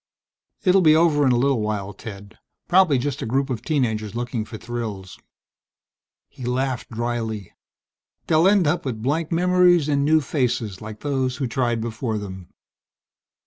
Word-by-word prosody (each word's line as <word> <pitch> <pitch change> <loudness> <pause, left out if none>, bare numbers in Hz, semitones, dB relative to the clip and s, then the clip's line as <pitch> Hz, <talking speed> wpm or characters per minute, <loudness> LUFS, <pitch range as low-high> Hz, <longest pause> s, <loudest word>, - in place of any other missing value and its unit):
"It 185 - +4
will 195 - +5
be 155 -3 +6
over 155 -4 +3
in - - +4
a 120 - +3
little 135 -2 +2
while, 105 -2 -3
Ted. 100 -1 -10 0.3
Probably 175 -6 +4
just 135 +2 -3
a - - -3
group 135 +3 0
of 120 - -3
teen 145 -5 +1
agers 110 -1 -4
looking 120 -2 -3
for 110 - -8
thrills." 110 -5 -6 1.1
He 130 - -12
laughed 125 +1 -2
drily. 115 -3 -3 0.7
"They'll 160 +2 +4
end 195 -3 +4
up 155 +4 +1
with 110 -5 -4
blanked 155 +5 -1
memories 180 -2 +4
and 140 -2 +1
new 155 +2 +4
faces 125 - -2
like 110 0 -9
those 130 -3 -1
who 135 - -2
tried 120 -2 -1
before 115 0 -3
them." 95 -3 -8
125 Hz, 165 wpm, -23 LUFS, 110-150 Hz, 1.1 s, be